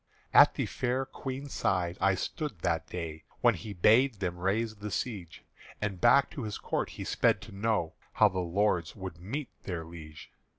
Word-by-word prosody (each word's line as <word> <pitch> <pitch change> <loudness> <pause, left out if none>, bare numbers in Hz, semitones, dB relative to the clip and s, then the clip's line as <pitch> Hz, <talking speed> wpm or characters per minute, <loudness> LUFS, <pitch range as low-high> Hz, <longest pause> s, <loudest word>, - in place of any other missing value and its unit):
At - - +8
the - - 0
fair 130 +1 -1
Queen's 135 +1 -6
side 90 -3 0
I 95 0 +4
stood 145 - -4
that 80 -2 0
day 80 -3 -6 0.2
When - - +5
he 110 - -7
bade 115 +8 +4
them 90 -3 -3
raise 110 +4 0
the 105 +1 -5
siege, 100 -6 -4 0.4
And 100 -4 -3
back 140 0 +5
to 140 - -6
his 105 -3 -4
Court - - -2
he - - -7
sped 115 -3 +2
to 105 - -11
know 100 -5 0 0.2
How - - +6
the 95 - -2
lords 90 -1 0
would 95 -4 -7
meet 130 +8 -4
their 85 -4 -4
Liege. 80 -2 -11
100 Hz, 180 wpm, -30 LUFS, 85-115 Hz, 0.4 s, At